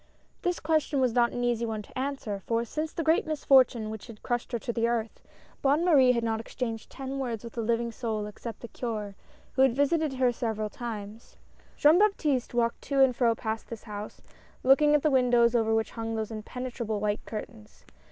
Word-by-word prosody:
This 355 -1 -1
question 305 -2 +1
was 255 -3 +2
not 235 0 +3
an 245 - -3
easy 240 -1 +1
one 220 -2 -3
to - - -18
answer, 260 -6 -3
for 230 0 +1
since 310 +6 -3
the 330 - -3
great 320 0 +2
misfortune 260 -7 +3
which 220 0 -8
had 225 -3 -12
crushed 240 0 -2
her 240 - 0
to 235 +1 -4
the 230 0 +1
earth, 230 -2 -2 0.4
Bonne 290 +5 +3
Marie 270 -7 +6
had 235 -1 -1
not 225 -1 0
exchanged 225 0 -5
ten 270 0 -5
words 240 -5 -3
with 235 - -9
a 235 - -1
living 235 +1 0
soul 220 -2 -3
except 210 +1 -8
the 235 - -7
Curd, 215 -4 -4 0.4
who 260 - +1
had 265 -3 +5
visited 290 +1 +1
her 255 -1 +2
several 220 -3 -3
times. 220 -1 -7 0.4
Jean 310 +4 +6
Baptiste 300 - +1
walked 235 -1 +1
to 280 -1 -1
and 265 -2 +5
fro 235 -2 +3
past 220 -1 -4
this 230 -2 -7
house, 210 -1 -8 0.4
looking 295 +3 +5
at 295 - +2
the 305 - +3
windows 245 -3 +4
over 225 -2 +2
which 225 0 +1
hung 225 -1 -4
those 220 0 -3
impene 220 +3 -6
trable 220 -3 -3
white 210 +1 -1
curtains. 110 - -9
235 Hz, 205 wpm, -28 LUFS, 225-270 Hz, 0.4 s, Marie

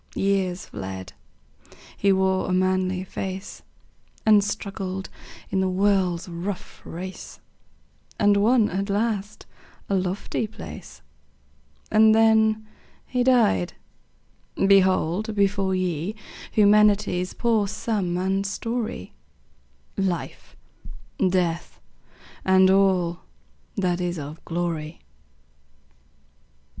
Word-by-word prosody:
Years 190 -2 0
fled; 95 0 -7 0.8
he 200 - +2
wore 190 -1 +1
a - - +1
manly 185 0 +1
face, 190 +1 -6 0.6
And 210 -2 +6
struggled 195 -2 -4 0.4
in 190 - +1
the 190 - +1
world's 185 -2 +1
rough 180 +3 -6
race, 185 +3 -8 0.8
And 205 -1 +4
won 220 +2 +4
at 195 +3 -2
last 210 0 -2 0.4
a - - 0
lofty 190 +3 -1
place. 215 - -10 0.9
And 220 0 +6
then 220 -1 +4 0.4
he 250 -1 0
died! 235 - +3 0.8
Behold 195 +1 +3
before 195 -1 +1
ye 180 +1 -2 0.4
Humanity's 205 -3 +3
poor 225 -4 +1
sum 195 -4 -2
and 190 +2 0
story; 220 - -4 0.8
Life, 185 -3 -3 0.7
Death, 175 -2 -1 0.6
and 190 0 +5
all 185 -3 +2 0.6
that 180 -2 0
is 175 -1 -2
of 150 +2 -8
glory. 165 -2 -3
190 Hz, 90 wpm, -24 LUFS, 180-205 Hz, 0.9 s, And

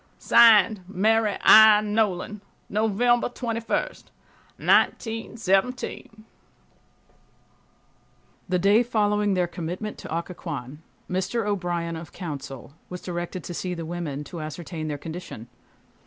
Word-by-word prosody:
(Signed) 220 -3 +5
MARY 210 +2 +1
I. 220 -1 +8
NOLAN. 210 -1 -1 0.3
November 225 +4 +1
21, 230 -2 -5 0.9
1917, 225 0 0 2.2
The 180 - +2
day 200 +5 +4
following 210 -3 +1
their 180 -1 +2
commitment 175 +5 -6
to - - -9
Occoquan 150 -5 -6 0.3
Mr. 190 +5 -2
O'Brien, 175 -4 -2
of 160 -1 -9
counsel, 140 -5 -8 0.2
was 180 - -6
directed 175 0 -5
to 175 - -6
see 180 +1 -4
the 165 -1 -6
women, 160 -4 -5
to 165 +2 -8
ascertain 155 +1 -6
their 150 -1 -3
condition. 160 -7 -8
185 Hz, 105 wpm, -25 LUFS, 170-215 Hz, 2.2 s, I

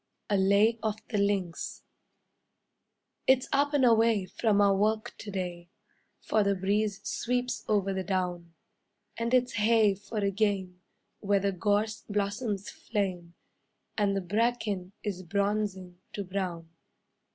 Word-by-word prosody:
A - - +4
LAY 200 +4 +4
OF 215 -2 0
THE 210 - 0
LINKS 195 -4 -1 1.4
It's 265 0 +4
up 285 +1 +2
and 270 -3 +4
away 225 -4 +4
from 205 +2 +1
our 200 -1 +5
work 215 +3 0
to 210 - -7
day, 175 -3 -4 0.5
For 215 - +2
the 200 0 +2
breeze 200 +2 0
sweeps 250 +1 -1
over 200 -2 +1
the 190 0 -2
down; 180 -2 -2 0.6
And 230 0 -2
it's 250 -1 +3
hey 215 -1 +4
for 205 +3 -8
a 200 -1 +1
game 195 -3 -1 0.4
where 200 -1 +2
the 200 +1 0
gorse 210 +3 0
blossoms 205 0 -2
flame, 180 -5 -3 0.6
And 200 -2 +1
the - - 0
bracken 205 -1 -1
is 195 -4 -3
bronzing 200 -1 -2
to 205 - -3
brown. 180 -3 -4
200 Hz, 135 wpm, -29 LUFS, 190-220 Hz, 1.4 s, our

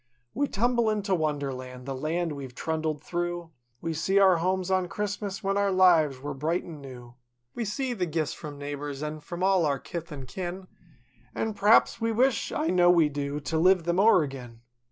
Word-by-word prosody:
We 285 +1 0
tumble 235 +1 +1
into 205 -2 0
Wonderland—the 135 -5 -3
land 160 +5 -2
we've 135 -4 -7
trundled 155 -1 -2
through— 175 -1 -3 0.3
We 165 0 -2
see 190 +5 0
our 190 -3 +6
homes 185 +2 -1
on 185 -1 +2
Christmas, 205 +1 -4
when 195 +1 0
our 200 -1 +2
lives 170 -7 +4
were 145 +2 -5
bright 160 +6 -1
an' 155 -4 -10
new; 125 -3 -11 0.4
We 235 - -3
see 250 +5 -2
the 185 -6 -2
gifts 155 -1 -1
from 145 -2 -8
neighbors, 145 0 -5
an' 150 0 -4
from 175 +4 -6
all 190 -2 +4
our 145 -3 +1
kith 170 +2 -7
an' 135 -3 -7
kin— 180 +7 -6 0.7
An' 220 -1 -1
p'raps 210 +3 +4
we 230 0 +1
wish—I 265 +6 +1
know 175 -1 +5
we 170 -4 +5
do, 145 0 -3
to 160 +2 -1
live 185 +1 +4
them 175 +2 0
o'er 200 -5 +6
agin. 125 -5 -8
170 Hz, 185 wpm, -27 LUFS, 145-195 Hz, 0.7 s, our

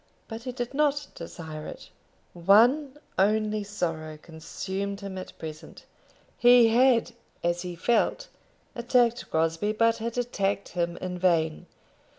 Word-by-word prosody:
But 225 0 -7
he 255 - -3
did 245 0 -5
not 290 0 +1
desire 160 -2 -8
it. - - -10 0.4
One 240 - +4 0.2
only 215 +1 +2
sorrow 165 -6 -4
consumed 190 +5 -5
him 195 -1 -6
at 185 - -10
present. 155 -1 -9 0.5
He 245 -1 +7
had, 245 +1 +4 0.3
as 175 0 0
he 180 -1 -6
felt, 240 - +1 0.5
attacked 240 -1 +1
Crosbie, 165 +6 0
but 230 +1 +2
had 230 +1 -4
attacked 200 -5 -1
him 170 -1 -2
in 180 -1 -5
vain. 165 -3 +1
200 Hz, 130 wpm, -27 LUFS, 170-240 Hz, 0.5 s, He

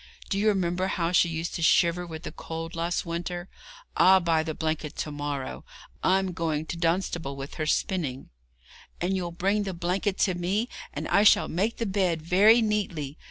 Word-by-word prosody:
Do 195 - +1
you 215 - +2
remember 185 -2 +1
how 175 -3 -1
she 175 -1 +4
used 165 +1 -3
to 170 - -4
shiver 170 +2 +3
with 160 0 -8
the - - -5
cold 165 +1 -6
last 170 +2 -1
winter? 175 +2 -4 0.5
I'll 190 0 +6
buy 165 -3 +2
the 160 -1 -4
blanket 155 -2 -3
to 150 - -4
morrow. 145 -2 -4 0.4
I'm 190 0 +2
going 160 -3 -2
to 165 - -5
Dunstable 170 -4 -1
with 135 +1 -7
her 155 - -1
spinning.' 150 -8 -1 0.7
'And 185 +2 0
you'll 180 -2 -2
bring 195 +5 0
the 195 -3 -4
blanket 185 +3 -1
to 190 - 0
me, 190 +7 -1 0.2
and 150 +2 -5
I 200 - +4
shall 210 - +5
make 205 +7 -1
the 230 - -2
bed 190 -5 0
very 210 +7 +5
neatly. 175 -9 -2
175 Hz, 185 wpm, -27 LUFS, 160-190 Hz, 0.7 s, I'll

